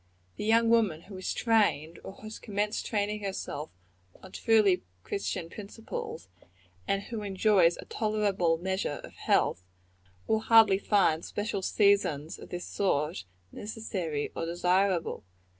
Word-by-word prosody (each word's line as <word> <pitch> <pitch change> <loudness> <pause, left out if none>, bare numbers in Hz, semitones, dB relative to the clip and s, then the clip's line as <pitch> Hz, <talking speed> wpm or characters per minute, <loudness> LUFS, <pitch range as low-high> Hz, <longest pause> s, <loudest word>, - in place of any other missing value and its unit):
The - - -5
young 230 +1 +4
woman 215 -9 +3
who 195 +2 -11
is 185 - -3
trained, 200 -9 +1
or - - -8
who - - -18
has 215 0 -8
commenced 210 +1 -2
training 210 -1 -1
herself, 175 -6 -4 0.5
on 190 - -11
truly 215 -5 +3 0.2
Christian 195 -4 -3
principles, 205 - -7 0.6
and 195 0 0
who 225 -1 -5
enjoys 195 -3 +3
a - - -9
tolerable 205 -6 +1
measure 190 -4 -2
of - - -11
health, 90 - +1 0.6
will 220 - +2
hardly 220 -3 +6
find 190 -6 +2
special 205 -1 -3
seasons 185 -8 +2
of - - -11
this 175 0 -5
sort 155 - -1 0.3
necessary 190 -9 -4
or 165 - -3
desirable. 180 +1 +1
195 Hz, 135 wpm, -29 LUFS, 170-215 Hz, 0.6 s, hardly